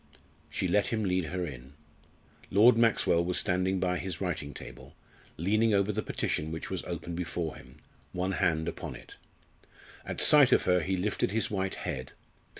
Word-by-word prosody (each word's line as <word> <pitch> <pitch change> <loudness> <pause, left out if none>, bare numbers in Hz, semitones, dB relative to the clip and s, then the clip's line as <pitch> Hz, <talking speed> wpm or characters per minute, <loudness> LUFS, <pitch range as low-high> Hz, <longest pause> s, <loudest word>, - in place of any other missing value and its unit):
She 95 - -1
let 100 +4 +2
him 110 -2 -1
lead 90 -2 0
her 90 +3 -3
in. 65 -2 -9 0.8
Lord 110 +5 +6
Maxwell 115 -7 +3
was 90 +1 0
standing 95 0 +1
by 90 -1 0
his 90 -3 -4
writing 80 -6 -3
table, - - -11 0.4
leaning 110 +5 +2
over 100 +1 +2
the 105 +1 -2
petition 80 -6 -2
which 80 - -6
was - - -2
open 85 - -5
before 85 -2 -3
him 65 +1 -15 0.3
one 90 +1 -2
hand 80 -2 0
upon 85 - -5
it. - - -13 0.9
At - - -5
sight - - +7
of - - +4
her 90 0 +3
he 95 +2 -1
lifted 100 +2 0
his 110 +2 -1
white 95 -2 -2
head. 65 0 -5
90 Hz, 170 wpm, -29 LUFS, 85-100 Hz, 0.9 s, sight